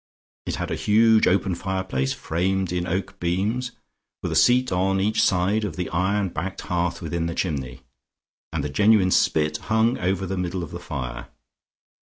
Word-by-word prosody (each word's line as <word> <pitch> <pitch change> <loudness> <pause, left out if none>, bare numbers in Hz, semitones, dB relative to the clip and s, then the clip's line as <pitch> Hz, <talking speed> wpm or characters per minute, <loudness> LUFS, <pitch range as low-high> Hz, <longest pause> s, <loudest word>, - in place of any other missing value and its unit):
It - - -1
had - - -4
a - - 0
huge 110 +1 +4
open 95 0 +2
fireplace 95 -8 -2
framed 95 +2 -1
in 90 0 -2
oak 95 +2 -3
beams 105 +9 -1 0.5
with - - -2
a - - -1
seat 125 +1 +4
on 95 +1 +1
each 105 +2 +1
side 100 +2 +2
of 105 - -3
the 90 -1 -3
iron 95 +3 +1
backed 90 +4 -5
hearth 90 0 -2
within 85 +1 -2
the 85 - -4
chimney, 65 -7 -3 0.7
and - - -2
a - - -2
genuine 100 +3 +4
spit 75 -2 +2
hung 110 +5 +1
over 95 +1 0
the 95 +1 -3
middle 90 0 -2
of - - -8
the 85 - -6
fire. 65 -8 -6
95 Hz, 175 wpm, -24 LUFS, 85-100 Hz, 0.7 s, huge